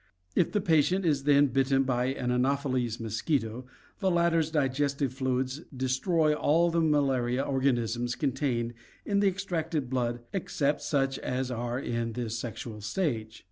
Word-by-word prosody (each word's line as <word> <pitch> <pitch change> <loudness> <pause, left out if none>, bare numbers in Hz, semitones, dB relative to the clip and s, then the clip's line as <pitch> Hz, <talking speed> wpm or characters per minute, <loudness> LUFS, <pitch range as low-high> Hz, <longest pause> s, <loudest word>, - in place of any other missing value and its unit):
If - - +2
the 210 - +1
patient 175 +3 +2
is 145 -4 +1
then 145 -1 +5
bitten 135 +1 +2
by 125 -2 0
an 130 -1 -1
Anopheles 130 -2 0
mosquito, 115 +1 -2 0.3
the 195 -2 +2
latter's 170 -2 +2
digestive 140 -2 0
fluids 130 +2 -1 0.2
destroy 150 +5 +2
all 155 +3 +3
of - - -5
the 170 - +3
malaria 135 -5 +2
organisms 120 -3 0
contained 130 -5 -1 0.3
in 200 -1 +1
the 200 - +4
extracted 165 -8 -2
blood 120 -2 -1
except 150 -6 0
such 135 -2 0
as 130 0 -2
are 120 0 -2
in 115 -3 -2
this 115 -2 -3
sexual 115 -2 -6
stage. 110 - -2
135 Hz, 145 wpm, -29 LUFS, 120-150 Hz, 0.3 s, then